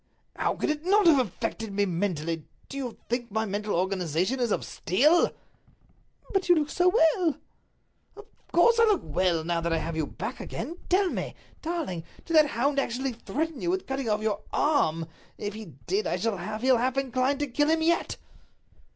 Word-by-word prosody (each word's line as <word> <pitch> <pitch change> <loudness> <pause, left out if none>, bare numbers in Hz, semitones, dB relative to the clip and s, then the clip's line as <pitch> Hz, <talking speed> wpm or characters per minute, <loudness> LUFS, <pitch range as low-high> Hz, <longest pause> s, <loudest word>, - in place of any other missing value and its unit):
"How - - 0
could - - 0
it 305 0 -4
not 400 +3 +4
have 315 -5 +7
affected 225 -1 -3
me 200 +1 +1
mentally? 170 -4 -2 0.2
Do 275 - -6
you 250 -4 -4
think 240 0 -1
that 210 - -19
my 220 0 +1
mental 205 +1 -2
organization 185 - 0
is 240 -3 0
of - - 0
steel?" 295 - +3 1.0
"But 385 -2 0
you 350 - +8
look 300 -2 0
so 355 0 +2
well." 325 -4 +3 0.8
"Of 420 - -11 0.3
course 460 +7 +5
I 460 - +7
look 420 -4 +3
well, 165 +1 +1
now 170 0 -1
that 170 0 -1
I 165 - +2
have 165 +1 -3
you 155 -2 -1
back 245 - -6
again. 310 +10 -5
Tell 370 0 +3
me, - - -4 0.3
darling, 315 - -3 0.2
did 335 - -1
that 305 -1 +7
hound 280 +2 +1
actually 265 +1 -1
threaten 300 +5 -3
you 345 - -1
with 375 +1 -1
cutting 270 -3 -3
off 210 0 +1
your 210 -1 -1
arm? 165 - +2 0.3
If 205 0 -4
he 220 0 -7 0.2
did, 410 +3 0
I - - 0
shall 225 -5 -1 0.2
feel 255 +2 +3
half 255 +2 0
inclined 265 +1 +1
to - - +2
kill 295 +4 +1
him 320 0 +2
yet." 340 +1 +1
255 Hz, 195 wpm, -27 LUFS, 200-320 Hz, 1.0 s, you